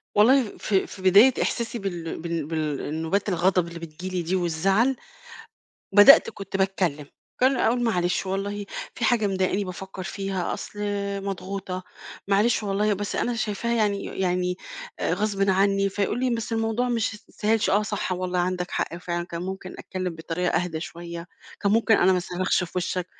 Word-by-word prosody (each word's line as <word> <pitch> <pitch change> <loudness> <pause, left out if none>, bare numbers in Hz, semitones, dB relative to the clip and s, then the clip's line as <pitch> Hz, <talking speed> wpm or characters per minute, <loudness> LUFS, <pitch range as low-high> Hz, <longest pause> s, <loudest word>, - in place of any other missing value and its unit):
والله 230 +2 +4
ف - - -4
في 190 0 0
بداية 200 +8 +7
إحساسي 235 0 -1
بال 175 -5 -4
بال 165 -2 -3
بال 155 -2 -2
النوبات 160 +7 -1
الغضب 180 -1 +2
اللي 170 0 -8
بتيجي 165 +3 -7
لي - - +1
دي 175 +3 -1
والزعل، 190 +9 +2 1.0
بدأت 205 +8 +8
كنت 195 -1 -5
باتكلّم، 185 -7 0 0.3
كان 260 +1 +4
اقول: 245 +1 +2
"معلش 180 -5 0
والله 200 +2 -3 0.3
في 240 - -3
حاجة 225 -2 +3
مضايقاني 190 +1 0
بافكّر 190 +1 -7
فيها، 195 -1 -3
أصل - - -8 0.5
مضغوطة، 190 -1 -4 0.5
معلش 210 +3 +3
والله 205 +1 +1
بس 205 +1 -4
أنا 245 - 0
شايفاها 220 +2 -1
يعني 205 -3 +1
يعني 180 -1 -1 0.5
غصبٍ 195 +2 +1
عني،" 195 +1 +3
فيقول 205 +4 -1
لي: 255 -1 +1
"بس 230 -1 -2
الموضوع 225 +2 0
مش 230 -2 0
ما 210 - -11
يستاهلش،" 220 +1 +1
"آه 205 +2 +3
صح 205 -3 -2
والله 180 0 -2
عندك 180 0 -1
حق - - -2
فعلًا 175 0 -3
كان 170 -1 -5
ممكن 190 0 -6
أتكلّم 185 -2 -4
بطريقة 165 +2 -2
أهدى 160 -3 -4
شوية، 170 0 -7 0.3
كان 200 -1 +2
ممكن 225 0 +4
أنا 190 0 +4
ما 180 - +2
أصرّخش 180 +1 0
في 170 - -12
وشّك." 180 0 -2
190 Hz, 165 wpm, -25 LUFS, 180-210 Hz, 1.0 s, بدأت